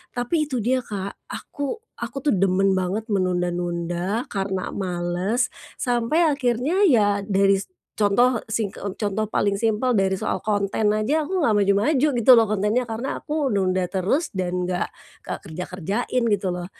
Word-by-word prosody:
Tapi 290 +6 0
itu 255 -6 -2
dia, 255 +3 +2
Kak, 200 -5 -6
aku 285 -2 -5 0.3
aku 235 +3 -5
tuh - - +3
demen 195 0 +2
banget 195 +4 -2
menunda-nunda 175 +2 -1
karena 195 -2 -2
males, 185 +6 -1 0.3
sampai 250 +7 +2
akhirnya 265 - 0
ya 205 -7 +3
daris 195 -1 +2 0.3
contoh 225 +4 +3
sing 220 -2 -1
e - - -6
contoh 215 0 -1
paling 200 -1 +1
simpel 225 +3 +1
dari 190 -2 +2
soal - - -2
konten 205 0 0
aja 215 +9 +1
aku 370 +5 -2
nggak 295 -11 +2
maju-maju 205 +9 +3
gitu 235 +2 +6
loh 225 -3 +5
kontennya, 215 +4 0
karena 230 +4 -3
aku 295 -5 -1
nunda 185 -2 +1
terus 200 - -1
dan 180 -1 -1
nggak 180 -1 -1 0.3
ka - - -5
kerja-kerjain 180 +8 -2
gitu 205 -4 +1
loh. 180 -1 -3
205 Hz, 150 wpm, -23 LUFS, 190-245 Hz, 0.3 s, gitu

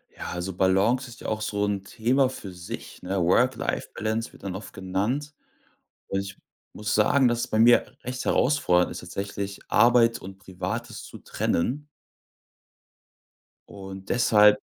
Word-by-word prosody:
Ja, - - -6
also 90 +2 -4
Balance 100 +8 +2
ist 120 - -13
ja - - -6
auch 110 0 -2
so 105 -1 -1
'n 100 -1 -2
Thema 125 +6 +1
für 100 -7 -8
sich, 90 -1 -9
ne? 95 +1 -1
Work 125 +9 +3
Life - - -3
Balance 110 +2 -2
wird - - -17
dann 95 -2 -4
oft 100 - -8
genannt 105 +11 -2 0.7
und 95 - -1
ich 100 0 -6 0.4
muss 105 0 -2
sagen, 125 +5 +4
dass 120 -1 +1
es - - -2
bei 110 - 0
mir 120 +1 +5
recht 130 +1 -4
herausfordernd 125 -11 +2
ist - - -6
tatsächlich, 100 +2 -5
Arbeit 120 -1 +4
und 95 +1 -10
Privates 95 -1 -5
zu - - -10
trennen. 140 - -1 1.8
Und 95 -1 -9
deshalb 105 -3 +5
105 Hz, 155 wpm, -26 LUFS, 95-120 Hz, 1.8 s, mir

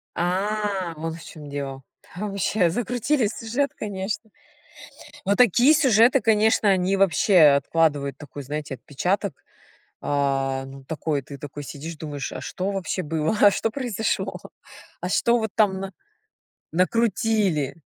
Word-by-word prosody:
А, 190 0 -1
вот 165 +1 -4
в 165 - -11
чем 150 -2 -10
дело. 135 -1 -5 0.3
Ваще, 200 -2 0
закрутили 245 - 0
сюжет, 235 +6 -2
конечно. 195 0 -3 1.1
Но 200 +1 +2
такие 250 - +5
сюжеты, 255 -4 +5
конечно, 220 -1 +3
они 190 0 +2
вообще 190 +1 +4 0.2
откладывают 145 -3 0
такой, 145 -1 -9
знаете, 145 0 -5
отпечаток. 180 - -2 0.6
А. 135 -2 0
Ну, 135 0 -11
такой, 155 -2 -2
ты 140 +1 -10
такой 145 +1 -8
сидишь 155 +4 -7
думаешь, 145 -3 -5
а - - -6
что 190 +2 -3
вообще 190 -1 -2
было, 160 +5 -1
а 205 - +8
что 225 - -1
произошло, 230 -4 -2 0.7
а - - -3
что 235 +1 +3
вот 220 -2 -3
там 195 -3 +3
на 195 0 -6 0.8
накрутили. 195 - +1
185 Hz, 130 wpm, -24 LUFS, 150-215 Hz, 1.1 s, а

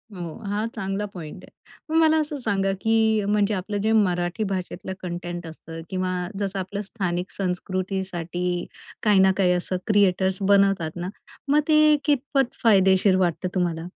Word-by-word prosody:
हो, 170 -3 -6 0.2
हा 210 +2 -1
चांगला 195 +2 -2
पॉइंट 175 +1 -9
आहे. - - -14 0.4
मग 325 - +4
मला 315 0 +4
असं 300 -1 -4
सांगा 195 -3 +1
की 220 -1 +2
म्हणजे 210 0 +2
आपलं 205 +2 -3
जे 220 - +1
मराठी 180 -2 +1
भाषेतलं 190 0 -4
कंटेंट 175 -1 -5
असतं 165 0 -9
किंवा 185 -1 -1 0.3
जसं 195 -1 -2
आपलं 195 +2 -4
स्थानिक 185 -4 -3
संस्कृतीसाठी 180 -2 -2 0.4
काही 210 -3 +4
ना 190 0 +6
काही 185 -2 +3
असं 180 +1 -2
क्रिएटर्स 190 -2 +3
बनवतात 195 -4 +3
ना, 175 +1 -4 0.4
मग 290 +2 +4
ते 305 -1 +6
कितपत 275 -2 +1
फायदेशीर 190 -3 +5
वाटतं 180 0 0
तुम्हाला? 170 -3 0
190 Hz, 150 wpm, -24 LUFS, 180-210 Hz, 0.4 s, ना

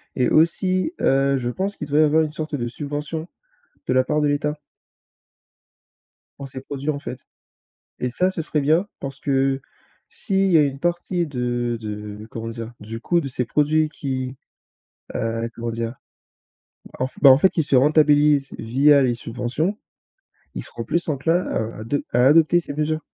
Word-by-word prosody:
et 125 -2 +2
aussi, 185 - +2
heu, 135 0 +3
je 120 -1 -2
pense 195 +9 -3
qu'il 150 - -6
devrait 150 +1 +3
y - - +7
avoir 155 +2 +3
une 155 - -3
sorte 155 0 -6
de 120 -3 -2
subvention, 150 +5 -5 0.6
de - - +1
la 130 0 +4
part 150 +3 0
de 150 - +2
l'État 150 +1 -1 1.8
pour 140 - -7
ces 130 0 -8
produit, 140 +1 -5
en 145 -2 -1
fait 130 -3 -7 0.8
et 125 - -1
ça 180 +9 +1
ce 165 - -3
serait 155 -2 -1
bien 160 +8 +2
parce 135 -1 -6
que 135 -1 +1 0.5
s'il 195 0 0
y 165 - +6
a 150 - +6
une 140 -1 -2
partie 175 +1 -1
de 120 -3 -2
de 105 -1 -7
comment 115 0 -5
dire, 115 0 -7
du 115 +2 -7
coût 170 +6 +1
de 140 - -4
ces 125 -1 -2
produits 155 +4 +2
qui, 130 -3 -4 0.8
heu, 115 0 -2
comment 115 0 -4
dire? 115 0 -3 1.1
En 130 - +1
f 130 - -17
bah, 140 -2 +9
en 130 - +7
fait, 190 +3 +3
ils 160 - +3
se 145 -2 +1
rentabilisent 150 0 +4
via 140 +5 +4
les 125 -3 +2
subventions, 125 - -2 0.8
ils - - -4
seront - - -7
plus 170 - -1
enclin 165 +5 +1
à 110 0 -3
ado 120 +6 -1
à 125 +1 +4
adopter 160 +4 +5
ces 145 -4 -7
mesures. 155 +1 -1
140 Hz, 180 wpm, -22 LUFS, 125-155 Hz, 1.8 s, bah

